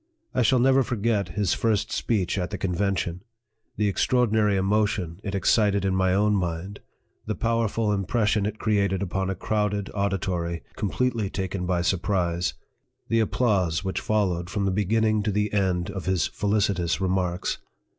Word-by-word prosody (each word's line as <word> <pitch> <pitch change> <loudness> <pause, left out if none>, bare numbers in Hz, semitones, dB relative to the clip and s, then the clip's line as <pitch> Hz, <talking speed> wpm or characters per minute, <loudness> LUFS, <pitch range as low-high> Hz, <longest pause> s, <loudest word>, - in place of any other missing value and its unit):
I - - +1
shall 130 +2 +4
never 135 +2 +4
forget 115 -4 0
his 100 -4 +2
first 110 -3 0
speech 100 -4 0
at 90 - -2
the - - -4
convention 90 -2 -1 0.6
the 105 0 +2
extraordinary 110 -1 +2
emotion 95 -3 0
it 100 -1 -3
excited 100 0 +2
in 95 -1 +1
my 95 -1 +2
own 105 +2 +3
mind 90 +1 -2 0.5
the - - -1
powerful 115 -2 0
impression 105 +1 +1
it 105 0 -4
created 100 -3 +1
upon 95 0 -2
a 95 - -1
crowded 105 0 -1
auditory, 90 -4 -2
completely 110 0 -1
taken 95 -2 -3
by 90 -1 +1
surprise 90 -2 0 0.5
the 115 - +3
applause 100 -7 +1
which 95 -1 -2
followed 90 -5 0
from 100 0 -1
the 95 - +1
beginning 110 +2 +1
to 105 +1 -1
the 105 +1 -1
end 95 -2 0
of 95 -2 -6
his 95 -6 +2
felicitous 100 -5 0
remarks. 90 -1 -1
100 Hz, 155 wpm, -25 LUFS, 90-105 Hz, 0.6 s, shall